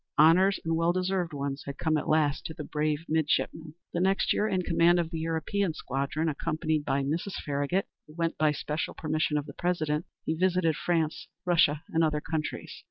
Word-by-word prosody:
Honors, 185 Hz, +5 st, +6 dB
and 165 Hz, 0 st, +1 dB
well 165 Hz, +1 st, +2 dB
deserved 185 Hz, -1 st, -1 dB
ones, 140 Hz, -1 st, -3 dB
had 140 Hz, 0 st, -5 dB
come 160 Hz, 0 st, +1 dB
at 150 Hz, -, -1 dB
last 150 Hz, -3 st, +2 dB
to 160 Hz, -, -8 dB
the 150 Hz, -, -6 dB
brave 150 Hz, +1 st, -1 dB
midshipman. 160 Hz, 0 st, 0 dB, 0.2 s
The 175 Hz, -, 0 dB
next 190 Hz, +2 st, +2 dB
year, 215 Hz, -, +1 dB
in 185 Hz, -3 st, 0 dB
command 170 Hz, +1 st, +4 dB
of 165 Hz, -1 st, -2 dB
the 165 Hz, -, -3 dB
European 165 Hz, +3 st, -1 dB
squadron, 140 Hz, +4 st, -2 dB
accompanied 155 Hz, 0 st, -1 dB
by 135 Hz, +1 st, +1 dB
Mrs. 165 Hz, +8 st, -2 dB
Farragut, 145 Hz, +6 st, 0 dB, 0.2 s
who 150 Hz, -, -15 dB
went 165 Hz, 0 st, -1 dB
by 155 Hz, -1 st, +3 dB
special 150 Hz, +2 st, -3 dB
permission 155 Hz, -1 st, 0 dB
of 145 Hz, -, -2 dB
the -, -, -9 dB
President, 155 Hz, -3 st, -1 dB, 0.2 s
he 160 Hz, -, +1 dB
visited 175 Hz, -1 st, +2 dB
France, 165 Hz, -1 st, -1 dB, 0.2 s
Russia, 155 Hz, -4 st, +3 dB
and 165 Hz, 0 st, +2 dB
other 155 Hz, -1 st, +1 dB
countries. 155 Hz, 0 st, -4 dB
160 Hz, 190 wpm, -28 LUFS, 150-170 Hz, 0.2 s, Honors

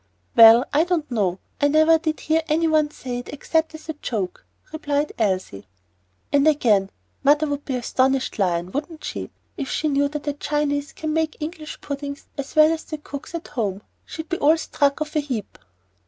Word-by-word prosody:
"Well, 230 Hz, +2 st, +9 dB
I 300 Hz, +3 st, +4 dB
don't 340 Hz, -5 st, -1 dB
know. 195 Hz, -6 st, 0 dB, 0.2 s
I 285 Hz, -, +5 dB
never 315 Hz, +2 st, +5 dB
did 315 Hz, -1 st, -2 dB
hear 320 Hz, +1 st, +2 dB
any 325 Hz, +2 st, +2 dB
one 310 Hz, -1 st, +3 dB
say 250 Hz, -4 st, -5 dB
it 245 Hz, -, -9 dB
except 320 Hz, +2 st, -1 dB
as 315 Hz, -, -12 dB
a 315 Hz, -, -3 dB
joke," 215 Hz, -10 st, -4 dB, 0.3 s
replied 295 Hz, -1 st, -1 dB
Elsie. 185 Hz, -, -1 dB, 0.7 s
And 285 Hz, +1 st, +4 dB
again: 220 Hz, -10 st, +3 dB, 0.3 s
"Mother 295 Hz, +2 st, +4 dB
would 290 Hz, -1 st, -3 dB
be 265 Hz, -, -2 dB
astonished, 260 Hz, +1 st, 0 dB
Lion, 175 Hz, -2 st, 0 dB
wouldn't 310 Hz, -, -5 dB
she, -, -, -5 dB, 0.3 s
if 275 Hz, -4 st, -4 dB
she 310 Hz, -, -1 dB
knew 285 Hz, 0 st, +2 dB
that 295 Hz, 0 st, -6 dB
a 290 Hz, -, +1 dB
Chinese 290 Hz, -1 st, -1 dB
can 310 Hz, -1 st, -3 dB
make 320 Hz, -1 st, 0 dB
English 310 Hz, 0 st, -6 dB
puddings 280 Hz, 0 st, -6 dB
as 280 Hz, -1 st, -6 dB
well 310 Hz, 0 st, +7 dB
as 320 Hz, -, -5 dB
the 310 Hz, -, -5 dB
cooks 290 Hz, +2 st, -8 dB
at 335 Hz, -, -6 dB
home. 205 Hz, -4 st, -3 dB, 0.2 s
She'd 320 Hz, 0 st, -7 dB
be 345 Hz, -, -2 dB
all 310 Hz, +3 st, +5 dB
struck 285 Hz, -2 st, 0 dB
of 310 Hz, +1 st, -4 dB
a -, -, +4 dB
heap." 255 Hz, -8 st, -5 dB
290 Hz, 190 wpm, -23 LUFS, 255-310 Hz, 0.7 s, Well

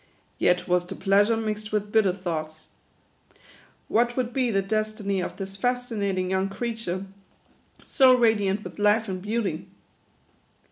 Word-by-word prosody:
Yet 180 Hz, 0 st, +2 dB
was 180 Hz, 0 st, +1 dB
the -, -, -6 dB
pleasure 205 Hz, +3 st, +3 dB
mixed 215 Hz, -1 st, -3 dB
with 210 Hz, -1 st, -1 dB
bitter 215 Hz, -4 st, +4 dB
thoughts. 160 Hz, -4 st, -5 dB, 1.2 s
What 240 Hz, +2 st, +1 dB
would 250 Hz, -2 st, -1 dB
be 255 Hz, -2 st, +1 dB
the 195 Hz, -3 st, +1 dB
des 215 Hz, +2 st, 0 dB
tiny 200 Hz, -3 st, -1 dB
of 180 Hz, -, -5 dB
this 195 Hz, -1 st, -5 dB
fascinatkfg 210 Hz, -6 st, -1 dB
young 190 Hz, +1 st, 0 dB
creature, 195 Hz, -3 st, -4 dB, 0.8 s
so 260 Hz, -3 st, +5 dB
radiant 210 Hz, -4 st, +2 dB
with -, -, -9 dB
life 210 Hz, +2 st, +3 dB
and 185 Hz, -1 st, -4 dB
beauty 200 Hz, -5 st, -2 dB
205 Hz, 140 wpm, -25 LUFS, 190-225 Hz, 1.2 s, so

